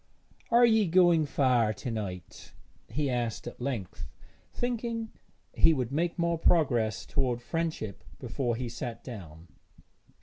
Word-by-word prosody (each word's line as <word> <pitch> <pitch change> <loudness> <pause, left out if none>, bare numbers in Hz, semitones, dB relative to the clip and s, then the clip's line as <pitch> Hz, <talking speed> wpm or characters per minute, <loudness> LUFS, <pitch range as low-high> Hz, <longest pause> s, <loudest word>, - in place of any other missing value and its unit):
'Are 240 +1 +6
you 220 -3 +4
going 170 -3 +4
far 125 -6 +2
to 120 - -5
night?' 95 -5 -6 0.3
he 145 0 -1
asked 120 -3 -2
at 120 - -8
length, 120 -9 -4 0.4
thinking 235 -2 -3 0.4
he 165 -1 +5
would 125 -3 -2
make 170 +5 0
more 170 -1 0
progress 120 -11 +2
toward 130 -4 0
friendship 155 - -3
before 125 -1 -2
he 125 +1 -3
sat 115 0 -6
down. 85 - -9
130 Hz, 130 wpm, -29 LUFS, 115-170 Hz, 0.4 s, Are